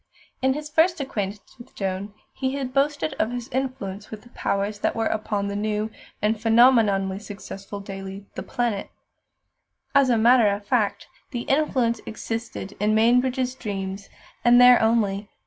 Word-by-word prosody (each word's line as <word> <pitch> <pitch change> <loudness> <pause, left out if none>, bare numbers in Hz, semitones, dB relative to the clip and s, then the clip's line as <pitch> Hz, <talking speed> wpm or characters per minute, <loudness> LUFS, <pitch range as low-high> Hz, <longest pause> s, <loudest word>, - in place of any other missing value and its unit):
In 265 0 +3
his 300 0 -5
first 325 +3 +2
acquaintance 210 -4 -5
with 240 +2 -14
Joan 195 +1 -3 0.2
he 265 0 -2
had 265 -2 -4
boasted 275 - +1
of 220 - +2
his 245 -1 -5
"influence" 225 -7 -4
with 215 -1 -9
the 240 - -17
powers 200 -2 -2
that - - 0
were 225 -1 0
upon 210 -2 -1
that 200 0 -3
new 215 +1 -1 0.3
and 215 0 +1
phenomenally 220 -5 +4
successful 200 -1 -8
daily, 195 0 -8
The - - -5
Planet. 240 -5 -2 1.0
As 275 -2 +5
a 235 - +4
matter 235 0 +5
of 200 0 -3
fact, 205 -3 0 0.2
the 240 - -4
influence 255 -5 +1
existed 225 -2 -5
in 210 +1 +2
Mainbridge's 250 +3 +2
dreams, 195 -5 -5 0.3
and 240 0 +6
there 245 0 +8
only. 210 -3 +1
220 Hz, 155 wpm, -24 LUFS, 200-250 Hz, 1.0 s, there